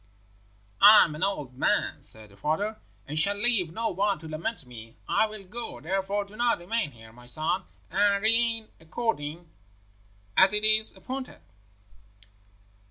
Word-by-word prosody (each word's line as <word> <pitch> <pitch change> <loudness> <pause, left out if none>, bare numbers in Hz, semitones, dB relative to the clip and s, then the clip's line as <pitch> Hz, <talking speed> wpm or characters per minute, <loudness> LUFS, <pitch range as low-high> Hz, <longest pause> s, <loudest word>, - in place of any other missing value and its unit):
"'I 210 +1 +10
am 155 - -6
an 150 - -8
old 150 -10 -2
man,' - - 0
said 110 -2 -4
the - - -18
father, 195 - -2 0.3
'and 150 +2 0
shall 200 +6 +3
leave 205 -6 +2
no 225 +5 -2
one 200 0 0
to 160 +1 -11
lament 155 - -4
me. 115 -2 -12
I 220 - +2
will 215 -2 -9
go, 235 +5 -5
therefore. 195 +4 -2
Do 200 - -18
you 240 +1 +2
remain 195 +2 -2
here, 110 -4 -15
my 120 +1 -15
son, 155 +8 -2 0.3
and 200 +2 +2
reign 225 0 +3
according 165 -3 -4 0.9
as 190 +2 +6
it 210 0 +1
is 215 0 +3
appointed.' 260 - -7
195 Hz, 155 wpm, -27 LUFS, 155-215 Hz, 0.9 s, I